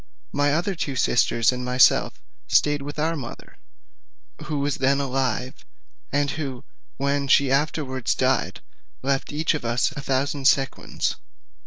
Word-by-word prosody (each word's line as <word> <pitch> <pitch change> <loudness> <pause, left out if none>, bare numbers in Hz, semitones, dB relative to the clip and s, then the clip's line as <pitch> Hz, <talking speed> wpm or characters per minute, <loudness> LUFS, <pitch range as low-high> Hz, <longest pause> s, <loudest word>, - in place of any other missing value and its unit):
My 145 0 +1
other 175 +5 0
two 150 -5 -3
sisters 120 -2 +3
and 125 0 -4
myself 125 0 +3 0.3
stayed 145 -1 +3
with 145 +2 -7
our 160 +2 0
mother, 130 -6 -9 0.9
who 150 - -3
was 140 0 -1
then 135 +1 +2
alive, 130 -2 -2 0.5
and 145 0 +1
who 135 -5 -5 0.3
when 140 0 0
she 140 -1 +4
afterwards 135 -3 0
died - - 0 0.4
left 135 0 -1
each 155 +3 0
of 155 - -4
us 120 +5 +1
a 150 -2 -6
thousand 135 +1 0
sequins. 135 -1 0
140 Hz, 140 wpm, -24 LUFS, 130-145 Hz, 0.9 s, she